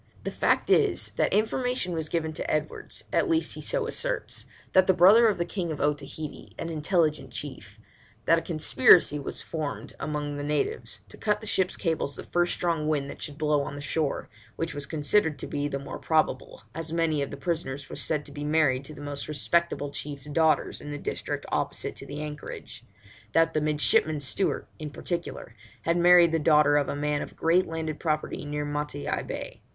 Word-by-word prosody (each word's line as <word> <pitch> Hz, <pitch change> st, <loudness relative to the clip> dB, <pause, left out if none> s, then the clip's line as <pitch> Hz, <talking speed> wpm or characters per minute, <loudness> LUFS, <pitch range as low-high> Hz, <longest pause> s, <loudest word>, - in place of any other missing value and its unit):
The -, -, -3 dB
fact -, -, +1 dB
is, -, -, +3 dB
that -, -, +2 dB
information 225 Hz, -2 st, 0 dB
was 160 Hz, -2 st, -2 dB
given 160 Hz, -2 st, -1 dB
to -, -, -3 dB
Edwards, 155 Hz, 0 st, -3 dB
at -, -, +2 dB
least 325 Hz, -1 st, +1 dB
he -, -, -7 dB
so -, -, 0 dB
asserts, -, -, -3 dB, 0.3 s
by 185 Hz, -, +8 dB
the 185 Hz, 0 st, +2 dB
brother 210 Hz, +7 st, +7 dB
of 210 Hz, -, +2 dB
the 170 Hz, -, 0 dB
King 175 Hz, -4 st, -3 dB
of 150 Hz, -, -4 dB
Otaheite, 145 Hz, +1 st, -3 dB
an 165 Hz, -, -4 dB
intelligent 155 Hz, -3 st, +1 dB
chief, 120 Hz, -8 st, -8 dB, 0.5 s
that 165 Hz, -, +5 dB
a -, -, -8 dB
conspiracy 155 Hz, -2 st, +5 dB
was 140 Hz, -, -5 dB
formed 155 Hz, -3 st, -4 dB
among 145 Hz, -1 st, -3 dB
the 145 Hz, -, -4 dB
natives 150 Hz, -, -2 dB
to -, -, -12 dB
cut 210 Hz, -1 st, +1 dB
the 220 Hz, -, -9 dB
ship's 190 Hz, -3 st, +1 dB
cables 160 Hz, -4 st, -1 dB
the -, -, -7 dB
first 175 Hz, 0 st, +1 dB
strong 165 Hz, -3 st, 0 dB
wind 145 Hz, -2 st, 0 dB
that -, -, -11 dB
should 145 Hz, -2 st, -6 dB
blow 150 Hz, -1 st, +2 dB
on 140 Hz, -, -5 dB
the -, -, -6 dB
shore, 145 Hz, 0 st, -1 dB, 0.3 s
which 165 Hz, 0 st, -3 dB
was 145 Hz, -1 st, -6 dB
considered 155 Hz, +1 st, +2 dB
to -, -, -5 dB
be 145 Hz, 0 st, -2 dB
the 140 Hz, -, -2 dB
more 140 Hz, +1 st, -7 dB
probable, 160 Hz, -1 st, 0 dB
as 165 Hz, -1 st, -4 dB
many 165 Hz, -3 st, +1 dB
of 140 Hz, -, -2 dB
the 140 Hz, -, -7 dB
prisoners 140 Hz, -3 st, -3 dB
were -, -, -7 dB
said 150 Hz, -2 st, 0 dB
to -, -, -12 dB
be 145 Hz, 0 st, -6 dB
married 150 Hz, -4 st, +2 dB
to 155 Hz, -, -9 dB
the -, -, -10 dB
most 145 Hz, -1 st, -5 dB
respectable 150 Hz, -1 st, 0 dB
chiefs' 140 Hz, -1 st, -7 dB
daughters 160 Hz, -1 st, +2 dB
in 145 Hz, -, -8 dB
the 145 Hz, -, -4 dB
district -, -, -4 dB
opposite -, -, -1 dB
to -, -, -9 dB
the 145 Hz, +1 st, -5 dB
anchorage; 150 Hz, -5 st, -7 dB, 0.5 s
that 165 Hz, 0 st, +4 dB
the 155 Hz, -, +1 dB
midshipman 150 Hz, 0 st, +3 dB
Stewart, 145 Hz, +8 st, 0 dB
in 155 Hz, -1 st, -5 dB
particular, 170 Hz, -4 st, -5 dB, 0.3 s
had 170 Hz, -, +2 dB
married 175 Hz, -1 st, +7 dB
the 165 Hz, -, +2 dB
daughter 150 Hz, -1 st, +5 dB
of 145 Hz, -1 st, +2 dB
a -, -, -2 dB
man 145 Hz, 0 st, 0 dB
of -, -, -7 dB
great 170 Hz, +3 st, +3 dB
landed 160 Hz, -2 st, -4 dB
property 155 Hz, -2 st, -1 dB
near 150 Hz, 0 st, -2 dB
Matavai 145 Hz, 0 st, -2 dB
Bay. -, -, -6 dB
155 Hz, 200 wpm, -27 LUFS, 145-170 Hz, 0.5 s, by